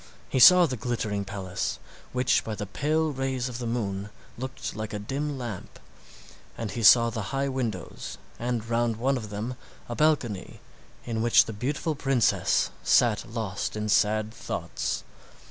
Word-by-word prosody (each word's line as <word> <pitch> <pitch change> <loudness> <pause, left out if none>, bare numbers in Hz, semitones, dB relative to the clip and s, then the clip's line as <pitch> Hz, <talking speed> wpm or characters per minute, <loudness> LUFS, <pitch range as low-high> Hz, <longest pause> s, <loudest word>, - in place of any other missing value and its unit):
He 130 - 0
saw 180 +7 +9
the 130 -5 -3
glittering 110 -3 -2
palace, 95 -10 -3 0.3
which 125 0 +2
by 110 - -4
the 105 - -4
pale 155 +9 0
rays 130 -2 -2
of 125 -1 -6
the 120 - -3
moon 100 -4 -2 0.3
looked 130 +2 -5
like 110 -1 -5
a - - -2
dim 135 +7 -3
lamp; 120 -7 -6 0.8
and 115 -3 -4
he 115 - -4
saw 115 +1 +7
the 110 -3 -4
high 135 0 0
windows, 120 -9 -4 0.2
and 120 -2 -2
round 115 0 +1
one 130 +5 +1
of 110 -5 -5
them 105 +5 -4 0.3
a 120 - -4
balcony 130 -10 0 0.5
in 115 -2 -2
which 120 0 +6
the 110 - -6
beautiful 140 +9 -2
princess 135 -5 +2
sat 115 -4 +3
lost 110 -5 -3
in 105 0 -2
sad 110 +1 +2
thoughts. - - -3
115 Hz, 160 wpm, -27 LUFS, 105-130 Hz, 0.8 s, saw